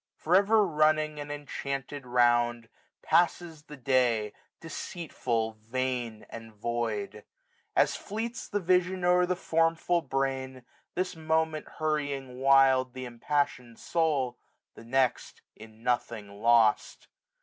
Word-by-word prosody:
For 170 Hz, +3 st, +1 dB
ever 205 Hz, +2 st, +5 dB
running 155 Hz, -2 st, +2 dB
an 145 Hz, 0 st, -6 dB
enchanted 140 Hz, -2 st, -5 dB
round. 120 Hz, -1 st, +2 dB, 0.3 s
Passes 165 Hz, -2 st, +1 dB
the 150 Hz, -, -11 dB
day, 120 Hz, -5 st, +1 dB, 0.3 s
deceitful, 130 Hz, -9 st, -3 dB
vain, 120 Hz, -1 st, -3 dB
and 115 Hz, -1 st, -10 dB
void; 105 Hz, -2 st, -3 dB, 0.5 s
1630 -, -, +6 dB
As -, -, -4 dB
fleets 230 Hz, +3 st, -5 dB
the 205 Hz, -, -1 dB
vision 185 Hz, 0 st, +1 dB
o*er 180 Hz, 0 st, +4 dB
the 180 Hz, -, 0 dB
formful 165 Hz, 0 st, +1 dB
brain, 130 Hz, -3 st, -3 dB, 0.3 s
This 185 Hz, -1 st, -2 dB
moment 160 Hz, -1 st, -1 dB
hurrying 145 Hz, -5 st, -2 dB
wild 135 Hz, -1 st, +4 dB
th' 130 Hz, 0 st, -5 dB
impassioned 125 Hz, -1 st, -2 dB
soul. 150 Hz, -7 st, 0 dB, 0.3 s
The 115 Hz, -, -13 dB
next 130 Hz, 0 st, 0 dB
in 110 Hz, +1 st, -15 dB
nothing 115 Hz, -4 st, -1 dB
lost. 110 Hz, +1 st, +2 dB
135 Hz, 115 wpm, -29 LUFS, 120-160 Hz, 0.5 s, 1630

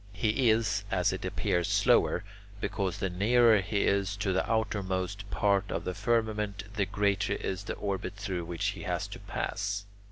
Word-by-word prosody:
He 110 Hz, +5 st, +2 dB
is, 110 Hz, -2 st, +2 dB
as 95 Hz, 0 st, +2 dB
it 95 Hz, -, -5 dB
appears, 90 Hz, -2 st, 0 dB
slower, -, -, +3 dB, 0.4 s
because 100 Hz, -3 st, -2 dB
the 95 Hz, -, -1 dB
nearer 110 Hz, +3 st, +5 dB
he 100 Hz, +1 st, -1 dB
is 100 Hz, +1 st, +1 dB
to 100 Hz, -2 st, 0 dB
the 95 Hz, +5 st, 0 dB
outermost 100 Hz, -3 st, -1 dB
part 100 Hz, 0 st, +2 dB
of -, -, -2 dB
the 90 Hz, -, -3 dB
firmament, 105 Hz, -1 st, 0 dB
the 100 Hz, -4 st, 0 dB
greater 100 Hz, +1 st, +1 dB
is 95 Hz, +1 st, -3 dB
the -, -, -3 dB
orbit 100 Hz, 0 st, -3 dB
through 95 Hz, -5 st, -3 dB
which 85 Hz, 0 st, -1 dB
he -, -, -6 dB
has -, -, -2 dB
to -, -, -8 dB
pass. 100 Hz, 0 st, -3 dB
100 Hz, 170 wpm, -30 LUFS, 95-105 Hz, 0.4 s, nearer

